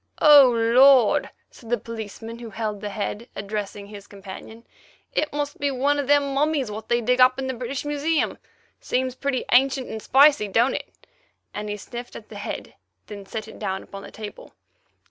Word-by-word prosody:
"Oh, 290 Hz, -4 st, +8 dB
Lord!" 240 Hz, +1 st, +5 dB, 0.2 s
said 230 Hz, -, -15 dB
the 240 Hz, -, +2 dB
policeman 225 Hz, +1 st, -8 dB
who 235 Hz, -1 st, -8 dB
held 215 Hz, -2 st, -4 dB
the 210 Hz, -, -4 dB
head, 210 Hz, +3 st, -5 dB
addressing 205 Hz, 0 st, -5 dB
his 205 Hz, -1 st, -11 dB
companion, 200 Hz, +3 st, -11 dB, 0.5 s
"it 305 Hz, -, 0 dB
must 290 Hz, 0 st, -4 dB
be 285 Hz, -, 0 dB
one 280 Hz, +2 st, +1 dB
of 280 Hz, -, -2 dB
them 285 Hz, -1 st, +3 dB
mummies 280 Hz, -4 st, 0 dB
what 215 Hz, +1 st, -8 dB
they 240 Hz, 0 st, +2 dB
dig 250 Hz, +2 st, +2 dB
up 255 Hz, 0 st, +6 dB
in 265 Hz, -, -3 dB
the 260 Hz, -, -2 dB
British 255 Hz, +3 st, -5 dB
Museum. 295 Hz, +2 st, -1 dB, 0.4 s
Seems 255 Hz, 0 st, -1 dB
pretty 265 Hz, 0 st, -2 dB
ancient 265 Hz, +1 st, +3 dB
and 220 Hz, 0 st, -6 dB
spicy, 280 Hz, -4 st, +5 dB
don't 235 Hz, +6 st, +2 dB
it?" -, -, -5 dB, 0.6 s
and 210 Hz, 0 st, -5 dB
he 205 Hz, -, -3 dB
sniffed 240 Hz, +4 st, -9 dB
at 215 Hz, -, -11 dB
the 210 Hz, -, -9 dB
head, 205 Hz, -, -6 dB, 0.3 s
then 200 Hz, -2 st, -10 dB
set 220 Hz, 0 st, -6 dB
it 220 Hz, -, -12 dB
down 190 Hz, -2 st, -3 dB
upon 195 Hz, -, -10 dB
the -, -, -10 dB
table. 210 Hz, -1 st, -10 dB
235 Hz, 185 wpm, -24 LUFS, 210-275 Hz, 0.6 s, Oh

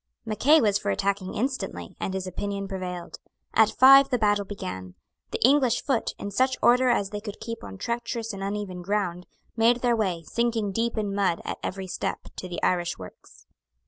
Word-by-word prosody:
Mackay 255 Hz, +9 st, +4 dB
was 205 Hz, -5 st, +2 dB
for 205 Hz, -, -3 dB
attacking 195 Hz, -1 st, -1 dB
instantly; 215 Hz, -, -3 dB
and 190 Hz, -, -3 dB
his 190 Hz, -1 st, -3 dB
opinion 200 Hz, +2 st, -4 dB
prevailed. 180 Hz, -2 st, -6 dB, 0.3 s
At 220 Hz, -1 st, +5 dB
five 275 Hz, +1 st, +8 dB
the 250 Hz, -, +2 dB
battle 205 Hz, -2 st, +2 dB
began. 95 Hz, -, -7 dB, 0.3 s
The -, -, -4 dB
English 265 Hz, -4 st, +3 dB
foot, 265 Hz, -5 st, -1 dB
in 200 Hz, -, -5 dB
such 260 Hz, +5 st, +1 dB
order 250 Hz, +1 st, +4 dB
as 205 Hz, -5 st, +1 dB
they 210 Hz, 0 st, -4 dB
could 205 Hz, -1 st, -7 dB
keep 230 Hz, 0 st, -6 dB
on 95 Hz, -1 st, -8 dB
treacherous 235 Hz, -, -3 dB
and 195 Hz, -, -7 dB
uneven 195 Hz, -2 st, -4 dB
ground, 180 Hz, -2 st, -2 dB, 0.3 s
made 235 Hz, +2 st, +3 dB
their 240 Hz, -1 st, +3 dB
way, 185 Hz, -7 st, -1 dB
sinking 225 Hz, +2 st, -1 dB
deep 230 Hz, +3 st, -1 dB
in 205 Hz, -2 st, -1 dB
mud 195 Hz, -4 st, +1 dB
at -, -, -4 dB
every 190 Hz, 0 st, -4 dB
step, 185 Hz, -, -4 dB
to 185 Hz, -, -6 dB
the 175 Hz, -, -5 dB
Irish 175 Hz, -1 st, +1 dB
works. 90 Hz, -1 st, -13 dB
205 Hz, 185 wpm, -26 LUFS, 185-235 Hz, 0.3 s, five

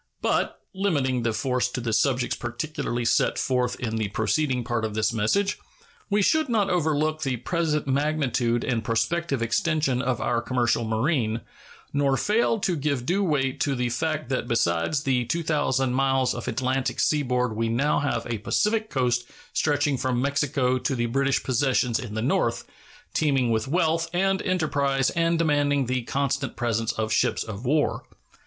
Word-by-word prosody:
But, -, -, 0 dB
limiting 145 Hz, -11 st, 0 dB
the 115 Hz, 0 st, 0 dB
force 125 Hz, +2 st, 0 dB
to 125 Hz, -, -4 dB
the 115 Hz, -3 st, -1 dB
objects 125 Hz, -2 st, -1 dB
particularly 120 Hz, -1 st, -3 dB
set -, -, +2 dB
forth 125 Hz, -1 st, 0 dB
in 115 Hz, -2 st, -2 dB
the 110 Hz, -2 st, 0 dB
preceding 125 Hz, +5 st, 0 dB
part 120 Hz, -1 st, -2 dB
of 110 Hz, -1 st, -3 dB
this 110 Hz, +1 st, +1 dB
message, 120 Hz, -, +1 dB, 0.5 s
we 205 Hz, 0 st, +2 dB
should 315 Hz, +5 st, +2 dB
not 210 Hz, -5 st, +1 dB
overlook 155 Hz, -2 st, +1 dB
the 130 Hz, -3 st, -1 dB
present 155 Hz, +3 st, -1 dB
magnitude 135 Hz, -4 st, 0 dB
and 115 Hz, -3 st, -1 dB
prospective 140 Hz, +4 st, 0 dB
extension 135 Hz, +1 st, +1 dB
of 130 Hz, -3 st, -1 dB
our 120 Hz, -1 st, 0 dB
commercial 120 Hz, -1 st, +1 dB
marine, 115 Hz, 0 st, 0 dB, 0.5 s
nor 140 Hz, -1 st, +2 dB
fail 225 Hz, -, +2 dB
to 180 Hz, -, +1 dB
give 140 Hz, -4 st, -1 dB
due 195 Hz, +6 st, +1 dB
weight 135 Hz, -6 st, 0 dB
to 140 Hz, -, 0 dB
the 125 Hz, -1 st, -1 dB
fact 155 Hz, +2 st, -2 dB
that 130 Hz, -2 st, -1 dB
besides 115 Hz, -, +1 dB
the 125 Hz, -3 st, +1 dB
2,000 145 Hz, -3 st, 0 dB
miles 135 Hz, -1 st, +2 dB
of -, -, -6 dB
Atlantic 130 Hz, +2 st, -1 dB
seaboard 125 Hz, -6 st, +1 dB
we 115 Hz, +1 st, 0 dB
have 115 Hz, -, -1 dB
now 145 Hz, -2 st, +1 dB
a 115 Hz, -3 st, -3 dB
Pacific 215 Hz, -, 0 dB
coast 125 Hz, -3 st, 0 dB, 0.3 s
stretching 145 Hz, -2 st, +1 dB
from 130 Hz, -2 st, 0 dB
Mexico 135 Hz, -1 st, +1 dB
to 135 Hz, +1 st, -1 dB
the 120 Hz, -1 st, 0 dB
British 135 Hz, +3 st, +1 dB
possessions 130 Hz, -2 st, +1 dB
in 115 Hz, -5 st, -6 dB
the 110 Hz, -, -1 dB
north, 135 Hz, -, +1 dB, 0.5 s
teeming 135 Hz, -6 st, +2 dB
with 110 Hz, +1 st, 0 dB
wealth 165 Hz, +1 st, +1 dB
and 195 Hz, +1 st, +1 dB
enterprise 140 Hz, -7 st, +1 dB
and 165 Hz, 0 st, +1 dB
demanding 145 Hz, -3 st, +2 dB
the 125 Hz, +1 st, -1 dB
constant 140 Hz, 0 st, -1 dB
presence 115 Hz, -1 st, 0 dB
of 110 Hz, 0 st, -2 dB
ships -, -, +1 dB
of 110 Hz, +2 st, -7 dB
war. 150 Hz, +3 st, +1 dB
135 Hz, 165 wpm, -25 LUFS, 120-155 Hz, 0.5 s, set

